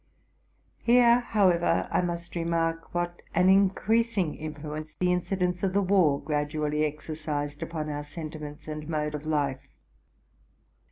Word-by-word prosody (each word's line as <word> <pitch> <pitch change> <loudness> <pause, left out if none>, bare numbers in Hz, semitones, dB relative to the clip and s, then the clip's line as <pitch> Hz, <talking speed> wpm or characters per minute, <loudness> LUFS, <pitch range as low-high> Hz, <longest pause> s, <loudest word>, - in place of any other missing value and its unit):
Here, 240 0 +5
how 215 -5 +3
ever, 175 -1 +1
I - - +2
must 170 -1 -4
remark 165 0 -1
what 175 0 -2
an 180 +1 +5
increasing 200 -1 +3
influence 155 0 -7
the 180 - +1
inci 180 +2 0
dents 180 -1 0
of 190 -1 0
the 200 - +3
war 180 -7 +3
gradually 150 0 -1
exercised 150 -1 -3
upon 155 -2 -4
our 145 -1 -3
sentiments 150 -1 -8
and 150 0 -6
mode 150 -1 -1
of 150 +1 -5
life. 140 -3 -1
165 Hz, 135 wpm, -27 LUFS, 150-180 Hz, -, Here